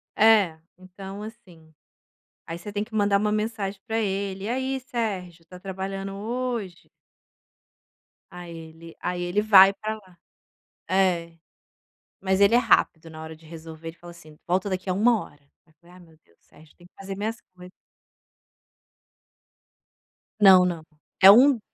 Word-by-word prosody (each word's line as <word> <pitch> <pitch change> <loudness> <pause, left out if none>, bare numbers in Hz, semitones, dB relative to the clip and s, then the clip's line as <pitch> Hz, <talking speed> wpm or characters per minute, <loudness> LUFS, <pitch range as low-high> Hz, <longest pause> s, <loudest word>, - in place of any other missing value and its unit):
É, 210 -7 +4 0.2
então, 190 +2 -10
assim, 180 -8 -14 0.7
aí 165 0 -6
você 205 +4 -9
tem 205 0 -2
que 220 +1 -15
mandar 205 -2 +2
uma 210 +1 0
mensagem 210 -2 -3
para 225 0 -1
ele: 195 -2 -3
"E - - -3
aí, 265 +2 -2
Sérgio, 200 -9 -5
está 180 +2 -14
trabalhando 195 +1 -6
hoje?". 225 -3 -5 1.4
Aí 175 -1 -10
ele 165 0 -12
aí 180 0 -3
ele 175 +4 0
vai 195 -2 +7
para 215 +2 -5
lá. 185 -5 -18 0.7
É, 175 -3 +1 0.9
mas 190 0 0
ele 200 +3 +5
é - - +7
rápido 165 -8 +2
na 155 0 -10
hora 160 0 -9
de 160 +1 -21
resolver, 160 0 -10
ele 165 - -13
fala 175 0 -12
assim: 155 -3 -16
"Volta 185 +3 0
daqui 185 0 -4
a - - +1
1 220 +3 +2
hora", 145 - -17 0.2
aí 160 - -29
eu - - -31
falei: 175 +1 -20
"Ai, - - -15
meu 160 -2 -20
Deus, 85 - -32
Sérgio, 155 -1 -21
tenho 175 0 -19
que - - -75
fazer 195 0 -7
minhas 220 +4 -4 0.2
coisas". 180 0 -13 2.7
Não, 190 -2 +8
não. 170 -3 -3 0.4
É 190 - +10
um 250 +4 +7
190 Hz, 160 wpm, -24 LUFS, 170-210 Hz, 2.7 s, É